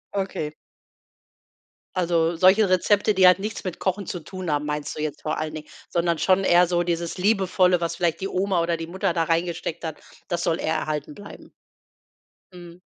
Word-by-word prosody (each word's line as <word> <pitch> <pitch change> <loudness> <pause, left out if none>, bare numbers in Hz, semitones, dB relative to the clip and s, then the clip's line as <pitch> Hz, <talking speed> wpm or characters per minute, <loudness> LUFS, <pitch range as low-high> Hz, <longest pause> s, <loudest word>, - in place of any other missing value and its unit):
Okay. 175 -6 -3 1.4
Also 170 -2 +1
solche 190 +4 +5
Rezepte, 205 +3 +3
die 185 -1 +6
halt 180 0 +6
nichts 210 +2 -5
mit 185 -3 -5
Kochen 190 0 -2
zu 175 - -4
tun 180 0 -6
haben, 145 0 0
meinst 150 -1 -4
du 150 - -4
jetzt 155 -2 -4
vor 155 - -2
allen 155 0 -3
Dingen, 155 -1 -8 0.2
sondern 170 -1 0
schon 190 +3 +2
eher 175 0 +5
so 175 0 0
dieses 170 0 -2
liebevolle, 185 -3 +2
was 170 - -2
vielleicht 170 -2 0
die 195 - -1
Oma 190 -2 0
oder 170 -1 0
die 165 0 -6
Mutter 180 -1 -1
da 165 -2 +1
reingesteckt 170 0 -2
hat, 160 - -5 0.3
das 175 -2 -2
soll 165 - 0
eher 160 - -1
erhalten 150 -1 -3
bleiben. 205 +4 -12 1.0
Mhm. 175 0 -12
175 Hz, 185 wpm, -24 LUFS, 165-185 Hz, 1.4 s, die